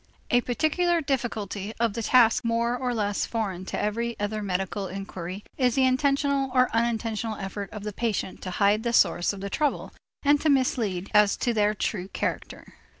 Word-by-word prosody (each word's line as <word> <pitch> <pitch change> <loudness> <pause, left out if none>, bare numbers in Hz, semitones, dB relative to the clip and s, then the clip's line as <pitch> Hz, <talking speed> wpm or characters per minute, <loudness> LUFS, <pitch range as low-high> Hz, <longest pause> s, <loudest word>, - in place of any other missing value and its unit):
A 245 - +5
particular 330 +8 +1
difficulty 220 - -3
of 230 -3 +1
the 230 - -3
task 230 0 +4
more 235 +1 +1
or 250 0 -2
less 205 -2 -1
foreign 195 -5 -3
to - - -4
every 230 +3 -2
other 210 +1 -2
medical 195 0 -2
inquiry 190 0 -6 0.2
is 250 -3 +2
the 265 - +4
intentional 275 +1 +1
or 255 0 +4
unintentional 225 -1 -1
effort 195 0 -5
of 210 -2 -8
the 210 0 -4
patient 215 -3 -2
to 185 - -5
hide 200 +3 +2
the 235 0 -2
sources 175 - +3
of 195 - -8
the 200 - -4
trouble 295 -2 -1 0.3
and 290 0 +4
to 315 - +2
mislead 225 -9 +1
as 210 -1 +5
to 240 - 0
their 210 -1 +2
true 190 -2 -2
character. - - -4
225 Hz, 180 wpm, -26 LUFS, 200-250 Hz, 0.3 s, A